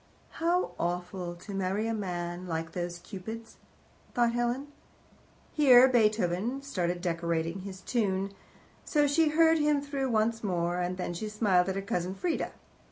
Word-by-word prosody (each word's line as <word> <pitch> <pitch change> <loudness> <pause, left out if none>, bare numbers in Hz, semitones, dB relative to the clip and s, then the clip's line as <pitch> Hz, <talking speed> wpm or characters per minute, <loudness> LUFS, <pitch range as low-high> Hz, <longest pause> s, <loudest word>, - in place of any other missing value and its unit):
"How 345 +2 +1
awful 175 0 -3
to 190 +4 -9
marry 195 +2 -1
a 225 - 0
man 180 -3 -4
like 165 -1 -3
those 175 0 -4
Cupids!" 220 +5 -8 0.6
thought 235 -1 +3
Helen. 240 +4 -1 0.8
Here 260 -4 +8
Beethoven 220 +1 +1
started 180 -9 -2
decorating 165 0 -1
his 190 0 -8
tune, 195 -5 0 0.5
so 295 -2 +2
she 305 +2 +3
heard 325 +1 +4
him 295 -1 +3
through 280 -2 -2
once 225 0 +1
more, 175 -2 0
and 180 +1 -2
then 180 -1 -3
she 210 +5 -4
smiled 195 -4 +2
at 190 - -2
her 195 - -2
cousin 180 -1 -2
Frieda. 335 - -1
195 Hz, 150 wpm, -29 LUFS, 180-245 Hz, 0.8 s, Here